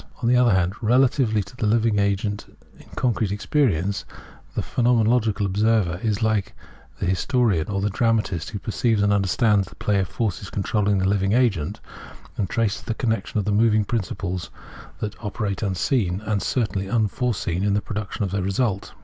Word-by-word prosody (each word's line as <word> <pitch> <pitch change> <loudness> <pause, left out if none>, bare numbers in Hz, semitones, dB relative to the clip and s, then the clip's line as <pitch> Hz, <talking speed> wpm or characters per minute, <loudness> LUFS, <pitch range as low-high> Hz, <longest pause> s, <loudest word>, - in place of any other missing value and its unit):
On - - +2
the 125 - +4
other 125 -1 +5
hand, 90 0 +1
relatively 120 -2 +3
to 125 - -15
the 110 - -1
living 110 -1 +2
agent 100 +1 -1 0.3
in - - -16
concrete 115 -5 0
experience, 100 - 0 0.5
the - - -1
phenomenological 115 -3 +2
observer 100 -2 +1
is 110 -1 -1
like 110 -3 0 0.4
the - - -3
historian 95 - +1
or 100 -1 -2
the 105 +1 0
dramatist 105 -6 0
who 110 - -5
perceives 110 +1 0
and 100 0 +3
understands 100 0 +2
the - - -14
play 105 -1 0
of 95 - 0
the - - -21
forces 100 -4 -2
controlling 105 0 0
the 95 0 +1
living 100 0 +1
agent, 110 -11 +1 0.6
and 95 -3 -2
traces 115 -2 0
the 115 - -4
connexion 110 -4 -1
of 105 - 0
the 105 - 0
moving 110 0 +3
principles 95 -6 -3 0.5
that 105 +2 -5
operate 100 -2 -3
unseen, 95 -1 0
and 105 -2 -1
certainly 105 -6 -1
unforeseen, 110 -4 0
in 100 -1 +2
the - - +3
production 105 0 -4
of 95 - -2
the 100 0 -1
result. 100 +1 -1
105 Hz, 175 wpm, -23 LUFS, 95-115 Hz, 0.6 s, other